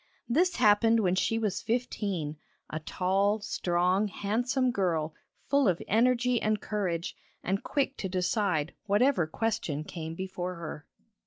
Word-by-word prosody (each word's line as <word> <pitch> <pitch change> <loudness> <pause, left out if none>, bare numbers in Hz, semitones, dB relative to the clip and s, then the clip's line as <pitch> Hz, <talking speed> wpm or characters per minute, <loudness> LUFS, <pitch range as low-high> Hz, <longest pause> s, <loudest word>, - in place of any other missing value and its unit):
This 345 +9 +2
happened 225 0 +4
when 180 -3 +2
she 210 +4 +1
was 210 -4 -1
fifteen 200 -10 -2 0.3
a 155 - -3
tall, 195 +6 +1
strong, 180 +1 +1
handsome 245 +6 0
girl 165 -7 0 0.3
full 280 -3 +3
of 180 -3 +2
energy 245 +2 +3
and 215 0 +1
courage, 185 -6 -2 0.3
and 195 +2 0
quick 275 -1 -1
to 190 - -3
decide 180 -3 0
whatever 205 - +3
question 160 -6 -2
came 160 0 -6
before 185 0 -4
her. 155 -3 -7
200 Hz, 135 wpm, -29 LUFS, 175-225 Hz, 0.3 s, happened